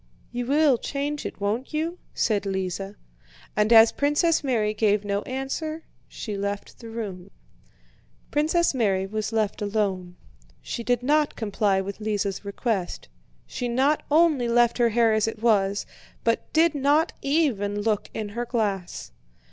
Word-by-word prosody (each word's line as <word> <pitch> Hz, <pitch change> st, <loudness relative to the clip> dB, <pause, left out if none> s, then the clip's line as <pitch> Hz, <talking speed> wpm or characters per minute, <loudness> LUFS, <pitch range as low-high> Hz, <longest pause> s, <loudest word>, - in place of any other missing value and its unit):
"You 245 Hz, 0 st, -3 dB
will 285 Hz, -3 st, +4 dB
change 285 Hz, +3 st, -3 dB
it, -, -, -10 dB
won't 220 Hz, +9 st, -2 dB
you?" 330 Hz, +3 st, -2 dB, 0.2 s
said 205 Hz, -3 st, +1 dB
Lise. 190 Hz, -1 st, -2 dB, 0.7 s
And 210 Hz, +1 st, +2 dB
as 225 Hz, -1 st, +8 dB
Princess 295 Hz, +3 st, +2 dB
Mary 220 Hz, -6 st, +1 dB
gave 210 Hz, -1 st, +1 dB
no 200 Hz, 0 st, -1 dB
answer, 310 Hz, +5 st, -4 dB, 0.2 s
she 210 Hz, -3 st, -6 dB
left 200 Hz, 0 st, -4 dB
the 230 Hz, -, -9 dB
room. 200 Hz, -5 st, -6 dB, 1.0 s
Princess 315 Hz, +3 st, +2 dB
Mary 195 Hz, -7 st, +1 dB
was 215 Hz, +2 st, -3 dB
left 215 Hz, -2 st, -1 dB
alone. 200 Hz, -4 st, -1 dB, 0.4 s
She 235 Hz, -, -5 dB
did 245 Hz, 0 st, 0 dB
not 300 Hz, +2 st, +2 dB
comply 205 Hz, -3 st, 0 dB
with 200 Hz, +2 st, -7 dB
Lise's 205 Hz, -2 st, -2 dB
request, 200 Hz, -2 st, -3 dB, 0.4 s
she 245 Hz, -, -4 dB
not 265 Hz, +5 st, +2 dB
only 300 Hz, -5 st, +4 dB
left 240 Hz, +1 st, +3 dB
her 235 Hz, -1 st, +4 dB
hair 230 Hz, 0 st, +3 dB
as 215 Hz, 0 st, +2 dB
it 225 Hz, -1 st, -4 dB
was, 205 Hz, -3 st, +2 dB, 0.4 s
but 230 Hz, 0 st, 0 dB
did 325 Hz, +1 st, +4 dB
not 290 Hz, +3 st, +2 dB
even 250 Hz, -9 st, +1 dB
look 215 Hz, -2 st, 0 dB
in 215 Hz, -2 st, -4 dB
her 235 Hz, +4 st, -4 dB
glass. 200 Hz, -, -2 dB
225 Hz, 150 wpm, -25 LUFS, 205-275 Hz, 1.0 s, as